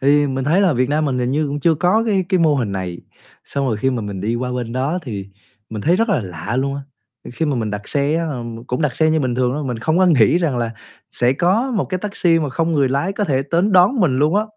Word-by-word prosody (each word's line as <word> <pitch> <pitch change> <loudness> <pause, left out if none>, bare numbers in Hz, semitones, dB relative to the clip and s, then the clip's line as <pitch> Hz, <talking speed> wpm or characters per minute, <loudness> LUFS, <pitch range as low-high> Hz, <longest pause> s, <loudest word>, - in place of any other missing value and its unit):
thì 145 +2 +3
mình 135 -1 -2
thấy 165 +8 +3
là 185 -5 +3
Việt 125 0 0
Nam 150 +2 +1
mình 130 -4 -1
hình 125 0 -1
như 150 +2 0
cũng 145 +1 -4
chưa 165 +1 +3
có 180 +8 +2
cái 195 -3 +1
cái 190 -2 +2
mô 155 -3 +4
hình 115 -6 -2
này. 90 -2 -4 0.5
Xong 140 -1 -2
rồi 115 -4 0
khi 130 +5 0
mà 120 -3 -2
mình 100 -2 -5
đi 110 +4 -1
qua 125 +1 -3
bên 120 -2 -4
đó 135 +8 -1
thì 100 -8 -6 0.4
mình 110 -2 -5
thấy 170 +3 +3
rất 230 +2 +1
là 190 -10 +2
lạ 90 +6 -5
luôn 140 +1 -1
á. 140 - -5 0.5
Khi 160 +6 -1
mà 145 -3 0
mình 110 -3 -2
đặt 105 0 -6
xe 145 +1 0
á, 165 - -1
ờm, 120 -3 -6
cũng 125 +6 -3
đặt 150 -4 -1
xe 160 0 +3
như 160 - +2
bình 130 -3 -1
thường 125 0 +1
thôi, 150 0 -3
mình 125 -4 -3
không 160 +8 0
có 185 - +4
nghĩ 160 -1 +4
rằng 150 -8 0
là 115 -1 -1 0.4
sẽ 120 +1 +1
có 190 - +1
một 220 -6 0
cái 185 - -3
taxi 180 -4 +1
mà 155 -3 -1
không 165 +5 -1
người 140 -4 +2
lái 140 +9 -1
có 205 +1 -1
thể 135 -6 0
đến 175 +8 0
đón 185 +8 +4
mình 150 -9 +2
luôn 155 +6 +2
á. 210 - +3
140 Hz, 290 wpm, -19 LUFS, 125-170 Hz, 0.5 s, mô